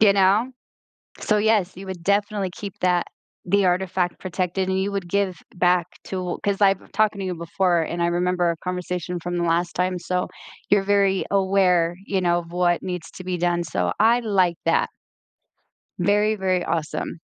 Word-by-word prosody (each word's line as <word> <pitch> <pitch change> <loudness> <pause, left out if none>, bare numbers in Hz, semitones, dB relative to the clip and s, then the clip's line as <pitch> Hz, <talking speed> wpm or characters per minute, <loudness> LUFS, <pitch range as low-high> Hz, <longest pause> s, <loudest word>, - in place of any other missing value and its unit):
you 210 -2 +7
know, 200 +6 +3 0.7
so, 215 - +1
yes, 210 -3 +2
you 195 - -8
would 190 -2 -6
definitely 200 0 +1
keep 200 -2 -6
that 180 -1 +2 0.4
the 200 +2 +3
artifact 180 0 0
protected 185 0 -2
and 190 0 +1
you 200 - -1
would 195 -3 -3
give 195 0 0 0.2
back 180 -1 +3 0.2
to 180 -2 -4
'cause 200 0 -1
I've 195 -1 +5
been - - -18
talking 210 0 +2
to 195 - -3
you 185 -1 -2
before 170 +1 +1
and 170 +2 -3
I 170 - +3
remember 175 0 +1
a 170 - -2
conversation 180 -1 -3
from 175 +1 -3
the 175 - 0
last 170 +1 +1
time, 180 0 0
so, 180 +1 -1 0.4
you're 205 -1 +4
very 195 -1 +2
aware, 190 -3 +3
you 195 -2 0
know, 175 -1 +2
of 170 -1 -10
what 175 -1 +1
needs 180 -3 -5
to 185 - -9
be 180 -1 -2
done, 175 0 +1
so 160 - -1
I 230 +3 +4
like 190 -6 +2
that. 475 +2 +2 1.1
Very, 210 +1 +2
very 185 -2 0
awesome. 165 0 -3
185 Hz, 185 wpm, -23 LUFS, 175-200 Hz, 1.1 s, you